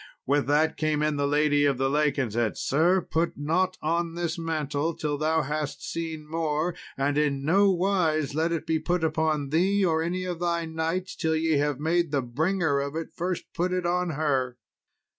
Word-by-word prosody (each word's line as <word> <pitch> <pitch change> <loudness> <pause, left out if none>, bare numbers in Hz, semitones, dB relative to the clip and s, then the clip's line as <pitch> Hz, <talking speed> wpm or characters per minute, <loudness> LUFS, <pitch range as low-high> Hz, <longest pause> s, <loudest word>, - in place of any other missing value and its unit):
With 140 +1 +1
that 155 +2 +2
came 155 -1 0
in 150 -1 0
the 140 0 +1
lady 145 0 +3
of 140 -3 +2
the 135 +1 +1
lake, 150 +1 +1
and 125 -7 -1
said, 115 -2 0
"Sir, 175 +7 +2
put 165 0 -1
not 185 +5 0
on 165 +1 0
this 170 -1 -2
mantle 160 -2 -2
till 150 -1 -2
thou 155 +2 +1
hast 150 +1 -3
seen 160 -2 -4
more; 160 +1 -1 0.2
and 140 +2 +1
in 140 -2 0
nowise 180 -4 +2
let 160 +3 0
it 165 - -2
be 160 -1 +1
put 175 0 -1
upon 155 -2 0
thee, 190 +6 +2
or 160 -2 +2
any 180 +2 -2
of 175 -2 -4
thy 170 -1 0
knights, 165 +4 -3
till 160 -1 0
ye 160 -1 +2
have 145 -2 0
made 170 +2 +1
the 140 -2 0
bringer 155 +4 0
of 140 +2 -3
it 165 0 -4
first 180 +1 -4
put 180 +2 -1
it 180 -1 -1
on 180 +1 +1
her." 130 -5 0
160 Hz, 195 wpm, -26 LUFS, 145-170 Hz, 0.2 s, lady